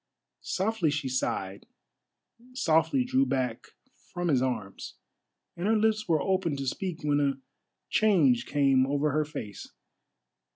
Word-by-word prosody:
Softly 190 -3 0
she 145 -2 -2
sighed, 100 -6 -3 0.9
softly 170 - +2
drew 260 +2 +2
back 130 - -2 0.4
from 175 -1 -2
his 135 -5 +3
arms, 115 -7 -4 0.6
and 175 +3 -3
her 220 0 +3
lips 215 0 +1
were 160 -3 +2
opened 185 -4 0
to 135 - -4
speak 165 +4 -4
when 145 -1 +2
a 140 -1 0 0.5
change 150 - +3
came 135 -2 +3
over 145 +2 0
her 155 +2 +1
face. 105 -9 -8
150 Hz, 130 wpm, -28 LUFS, 130-190 Hz, 0.9 s, his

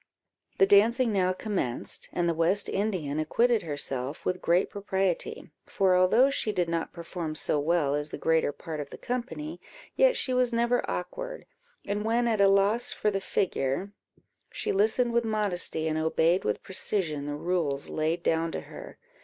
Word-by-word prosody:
The 195 - +6
dancing 225 +4 +4
now 185 -2 +2
commenced, 185 - -3
and 175 -1 0
the 170 - +2
West 170 +5 +1
Indian 185 -8 -2
acquitted 230 +9 +2
herself 140 -2 -4
with 180 0 -1
great 175 +2 +2
propriety; 190 -5 -2 0.2
for 190 -2 +2
although 220 +9 +4
she 220 -5 0
did 180 -4 0
not 165 0 -2
perform 170 -2 -5
so 150 - +1
well 150 -2 +1
as 150 +1 -1
the - - -6
greater 160 -2 +2
part 155 +1 -7
of 145 -1 -5
the - - -9
company, 260 +6 -5 0.3
yet - - +4
she 255 - -1
was 250 -1 +2
never 235 +1 +2
awkward; - - -5 0.4
and 205 +1 -2
when 235 +2 +1
at 220 -3 +1
a 200 - +7
loss 200 +4 +3
for 210 - 0
the 195 -1 -2
figure, 180 +1 -1 0.6
she - - -2
listened 220 +4 +2
with 235 0 +2
modesty, 200 -7 0
and 155 0 0
obeyed 160 +3 +2
with 105 - -1
precision 170 -7 -2
the 145 - -3
rules 150 -4 -1
laid 160 +2 -1
down 165 0 +1
to - - -3
her. - - -11
185 Hz, 170 wpm, -28 LUFS, 160-220 Hz, 0.6 s, a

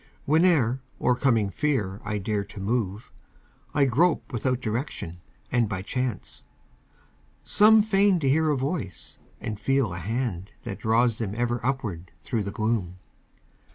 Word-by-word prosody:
Whene'er, 150 -6 +3 0.2
o'ercoming 120 -5 +2
fear, 105 - -1
I 105 0 -2
dare 105 +1 -1
to 100 +1 -11
move, 105 0 -2 0.6
I 145 -1 +3
grope 155 +6 +2
without 125 +1 0
direction 110 - -4 0.3
and 120 -4 +2
by 95 -2 -3
chance. 125 -2 -4 1.0
Some 215 +1 +6
feign 200 -3 +3
to 140 - +1
hear 155 +3 +3
a 145 - +2
voice 135 - -4 0.2
and 105 -2 -5
feel 135 -4 +1
a 90 - -5
hand 105 -1 -3
That - - -6
draws 115 +1 +2
them 105 -3 -3
ever 120 0 -1
upward 105 -10 -2
thro' 115 -4 -1
the 100 - -3
gloom. 110 -4 -1
120 Hz, 140 wpm, -26 LUFS, 100-135 Hz, 1.0 s, Some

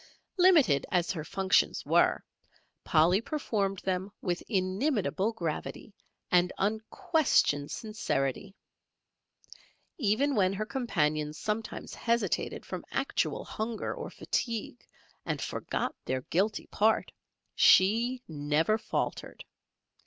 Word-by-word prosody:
Limited 310 - +5
as 175 -2 +1
her 160 -5 -4
functions 190 +3 +1
were, - - +3 0.6
Polly 170 +5 +4
performed 210 -9 -2
them 190 +1 -2
with 175 -3 -2
inimitable 200 +1 0
gravity 170 +3 -5 0.4
and 180 0 +4
unquestioned 220 - +1
sincerity. 195 - -3 1.4
Even 260 +5 +2
when 190 -5 +2
her 210 +2 -3
companions 155 - -1
sometimes 215 +3 -4
hesitated 235 0 -1
from - - -6
actual - - -1
hunger 220 +1 -3
or - - -6
fatigue 225 - -3 0.4
and - - -2
forgot - - -3
their 130 0 -1
guilty 195 +10 -1
part, 220 +1 +1 0.4
she 235 +6 +4
never 155 +7 +1
faltered. - - -4
200 Hz, 100 wpm, -29 LUFS, 175-225 Hz, 1.4 s, Limited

